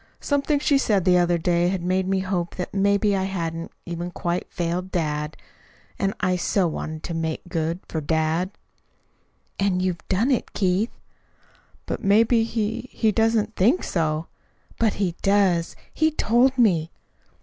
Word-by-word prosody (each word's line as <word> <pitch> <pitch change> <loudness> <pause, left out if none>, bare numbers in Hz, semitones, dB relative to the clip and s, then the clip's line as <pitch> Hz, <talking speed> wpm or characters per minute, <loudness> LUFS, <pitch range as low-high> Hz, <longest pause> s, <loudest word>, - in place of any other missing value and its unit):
Something 285 +1 +1
she 285 -1 +2
said 200 -8 +1
the 180 -1 +5
other 175 0 +2
day 175 +2 +1
made 185 +1 0
me 190 0 +1
hope 180 -3 -2
that 180 - -5
maybe 200 +1 +2
I 190 -1 0
hadn't 165 -3 -4
even 175 0 -4
quite 175 0 -3
failed 175 +2 -2
dad. 150 -2 -2 0.6
And 195 0 0
I 185 -2 +1
so 185 +1 +1
wanted 155 0 -5
to 170 - -4
make 160 0 -3
good 165 0 -2
for 160 - -3
dad!" 160 +4 0 1.1
"And 195 -2 +1
you've 180 -3 -2
done 220 +8 +1
it, 255 - -1
Keith." 195 +3 0 0.9
"But - - -4
maybe 225 +3 +4
he 230 +2 -3
he 220 -2 +1
doesn't 225 0 +1
think 240 - +3
so." 155 -2 -1 0.5
"But 225 -2 +2
he 190 -4 -1
does. 195 -4 +2 0.2
He 315 0 +3
told 260 -2 +2
me." 175 -10 +3
185 Hz, 150 wpm, -24 LUFS, 170-210 Hz, 1.1 s, the